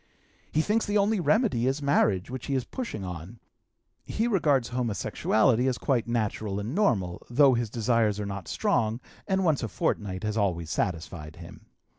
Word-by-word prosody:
He 155 - +2
thinks 215 +7 0
the 205 +1 +2
only 205 +1 +2
remedy 185 - +2
is 135 +2 0
marriage, 125 -8 +1
which 130 -2 -6
he 140 - 0
is 130 - 0
pushing 235 - -5
on. 90 +5 -8 0.6
He 225 +2 -1
regards 145 - +2
homosexuality 120 0 +1
as 130 -2 0
quite 125 -6 0
natural 110 -3 -1
and 105 +5 -4
normal, 100 - +1
though 135 +2 +5
his 120 -2 -1
desires 115 -2 +1
are 105 - -2
not 100 -2 -6
strong, 115 -1 0 0.3
and 190 -1 +1
once 155 -5 +2
a 115 - -2
fortnight 95 -2 -2
has 105 +1 -2
always 85 -6 0
satisfied 80 -4 -3
him. - - -12
115 Hz, 170 wpm, -27 LUFS, 100-140 Hz, 0.6 s, though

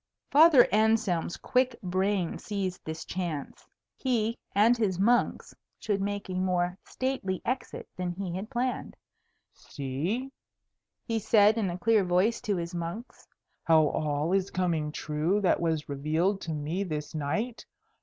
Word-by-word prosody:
Father 295 -3 +7
Anselm's 215 -6 +2
quick 255 -1 +1
brain 185 0 0
seized 190 -3 -4
this 160 0 -6
chance. 170 -6 -5 0.3
He 230 -3 0 0.2
and 220 +4 +5
his 205 -6 0
monks 235 +5 +2 0.2
should 200 -2 -1
make 205 0 -3
a 185 - -5
more 180 -1 0
stately 255 -8 -2
exit 255 +2 -3
than 180 -1 -2
he 180 0 -5
had 195 +4 -5
planned. 250 0 -2 0.6
"See," 165 - -4 0.7
he 225 -2 -1
said 210 0 +5
in 215 -5 0
a 175 - -4
clear 220 +2 +3
voice 185 +6 +2
to 210 -4 -1
his 170 +1 -4
monks, 175 +8 -6 0.4
"how 160 -2 +5
all 150 +3 -1
is 195 0 +1
coming 165 -5 -1
true 155 +6 -1
that 185 - +3
was 160 -3 -1
revealed 160 +8 0
to 165 - -5
me 155 +6 -2
this 150 -5 -5
night! 165 - -2
190 Hz, 145 wpm, -28 LUFS, 165-220 Hz, 0.7 s, Father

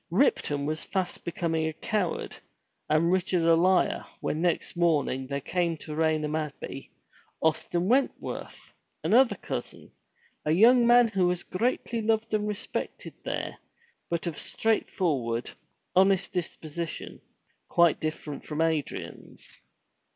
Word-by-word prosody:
Ripton 140 -1 +2
was 155 +1 -2
fast 190 -2 -3
becoming 165 -2 -1
a 160 - -3
coward 195 +2 -2 0.5
and 160 +3 +3
Richard 180 -2 +1
a 165 0 +5
liar 180 +2 +3 0.2
when 155 - -2
next 175 0 0
morning 150 -6 +1
there 140 +1 -2
came 170 +2 -1
to 150 - -8
Raynham 155 -1 +1
Abbey, 150 -3 -5 0.5
Austin 170 +3 0
Wentworth, 265 +5 -1 0.3
another 250 +2 +5
cousin, - - -6 0.5
a - - -2
young 235 +6 +6
man 240 -1 +6
who 190 -4 +2
was 180 0 -1
greatly 230 +2 -1
loved 220 0 0
and 210 -1 +1
respected 210 -1 -4
there, - - -4 0.5
but 170 0 -1
of 170 -4 -3
straightforward, 145 - 0 0.4
honest 190 0 +4
disposition, 170 -2 -5 0.5
quite 170 -2 +4
different 155 -2 -4
from 150 0 -4
Adrian's. 160 -3 -3
170 Hz, 120 wpm, -28 LUFS, 155-195 Hz, 0.5 s, young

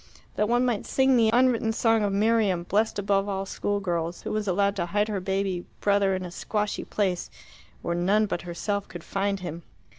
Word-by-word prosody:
That 210 +1 +1
one 240 +1 +3
might 240 -4 -1
sing 265 0 +3
the 225 -2 +4
unwritten 240 -2 +3
song 225 -1 +2
of 205 -1 +1
Miriam, 205 -3 +2
blessed 210 +5 0
above 200 0 +1
all 195 0 -2
school 205 +1 -2
girls, 170 -3 -3
who - - -4
was 215 -1 -2
allowed 200 +2 +2
to 175 -2 -1
hide 205 +4 0
her 205 -2 -1
baby 190 -1 -1 0.2
brother 200 -1 +2
in 185 -1 -4
a 175 - -7
squashy 210 +3 -2
place, 190 -4 -1 0.5
where 170 - -1
none 195 +5 +2
but 195 - -3
herself 200 +4 -3
could 175 -2 -9
find 195 0 -1
him! 170 -1 -6
200 Hz, 200 wpm, -26 LUFS, 185-215 Hz, 0.5 s, the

